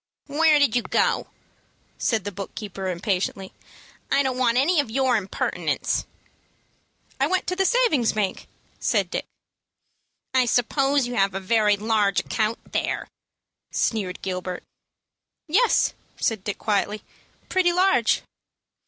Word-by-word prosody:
"Where 305 +1 +4
did 285 -6 +3
you 245 - +3
go?" - - +1 0.7
said 225 -5 +1
the 205 - -4
book 195 0 -7
keeper, 195 -3 -5
impatiently. 190 +1 -2 0.6
"I 275 +1 +3
don't 260 -1 -1
want 240 -2 +3
any 310 +6 +3
of 285 - 0
your 260 +1 +2
impertinence." 200 -3 -1 1.1
"I 275 - +3
went 370 +3 0
to 365 - -1
the 385 0 +2
savings 460 - +3
bank," 205 -3 -2 0.3
said - - +1
Dick. - - -3 1.1
"I 260 -1 +4
suppose 270 +3 +2
you 245 - -4
have 195 -1 +2
a - - -1
very 210 +1 +2
large 210 -1 +1
account 220 0 -2
there," - - -2 0.6
sneered 195 -5 -1
Gilbert. 185 -1 -4 0.8
"Yes," 450 +10 +3 0.2
said 220 -4 -1
Dick, 205 - -3
quietly; 210 0 -1 0.4
"pretty 370 -2 +2
large." 360 - +3
230 Hz, 130 wpm, -24 LUFS, 200-280 Hz, 1.1 s, Where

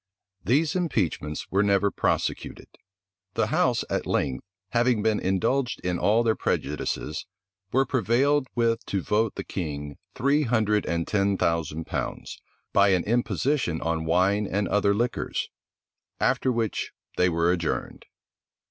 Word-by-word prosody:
These 145 - +2
impeachments 95 - -1
were 100 - +3
never 100 -1 +3
prosecuted. - - -2 0.7
The - - +2
house - - +2
at - - -2
length, 65 -3 -1 0.3
having 120 -2 +2
been 110 -1 +2
indulged 115 +7 0
in 90 -1 -1
all 110 +3 +3
their 110 -1 +2
prejudices, 75 +2 -2 0.4
were 135 +2 +3
prevailed 130 +4 +2
with 115 -1 +1
to 95 -3 -1
vote 110 0 +1
the - - -4
king 75 -5 -5 0.2
three 140 +4 +2
hundred 110 -5 +1
and 85 -1 -1
ten 100 -1 +1
thousand 80 -2 -1
pounds, - - -5 0.3
by 100 0 +5
an 90 - +2
imposition 120 - 0
on 80 -1 -1
wine 95 +5 +2
and 100 +1 0
other 100 0 +2
liquors; 120 +3 -1 0.7
after 130 - +2
which 115 -3 -2 0.2
they 90 - +3
were 85 +1 +2
adjourned. 85 -3 -2
100 Hz, 135 wpm, -26 LUFS, 85-120 Hz, 0.7 s, by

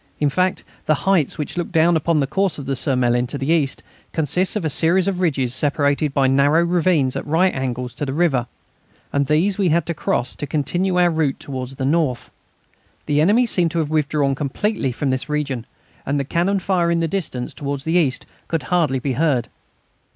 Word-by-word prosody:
In 150 - +2
fact, 185 +5 0 0.2
the 155 - +4
heights, 190 -7 +2
which 155 +3 -3
look 175 - -3
down 165 +1 +3
upon 160 0 +1
the 140 - +2
course 195 +6 -1
of 140 - -7
the 135 0 -1
Surmelin 125 -3 +1
to 140 - -5
the 135 +3 -1
east, 150 -5 +1 0.3
consist 175 +6 +1
of 205 -6 -2
a - - +2
series 170 +5 +3
of 190 -2 -1
ridges 135 -8 +1
separated 145 +1 +1
by 135 -1 +2
narrow 140 +5 +3
ravines 170 -6 +1
at - - -3
right 175 +5 +2
angles 125 -2 -3
to 140 +3 -4
the - - -2
river, 135 -6 +1 0.7
and 140 -1 +1
these 180 +7 +1
we 190 -3 +2
had 165 0 +2
to 170 - -2
cross 125 -4 -1
to 145 - -4
continue 175 +6 -1
our 175 -1 +4
route 155 -4 0
towards 130 -1 -6
the 130 - -3
north. 145 -4 0 0.7
The 150 0 +2
enemy 210 +9 +4
seemed 180 -7 +2
to - - -2
have 155 -2 -1
withdrawn 150 -2 +1
completely 145 - -1
from 135 +3 -2
this 130 +3 -3
region, 140 -6 -2 0.4
and 140 +1 -1
the - - 0
cannon 175 +8 0
fire 180 -2 0
in 170 0 +1
the 165 - 0
distance 155 -9 -4
towards 140 -1 -4
the 160 - -1
east 155 -8 +1 0.2
could 165 -2 -2
hardly 165 -7 +1
be 130 +1 -2
heard. 135 -4 +1
150 Hz, 205 wpm, -20 LUFS, 135-170 Hz, 0.7 s, the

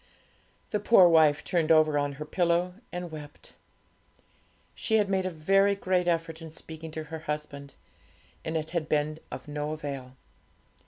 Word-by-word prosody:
The 210 - +1
poor 205 -3 +7
wife 155 -3 +5
turned 165 -2 +1
over 155 -1 +5
on 145 -1 0
her 150 +2 -7
pillow 175 +2 +1 0.2
and 175 -1 -5
wept. 150 -2 -10 1.2
She 220 - -1
had 210 -2 +3
made 190 -1 +1
a - - -1
very 195 +5 +3
great 185 -2 0
effort 165 -1 -1
in 165 - -8
speaking 160 0 -9
to 160 - -4
her 160 +1 -7
husband, 150 -2 -6 0.7
and 160 0 -2
it 155 0 -4
had 165 -3 -2
been 155 +1 0
of - - -8
no 150 +1 -3
avail. 140 -4 -6
160 Hz, 160 wpm, -28 LUFS, 150-175 Hz, 1.2 s, poor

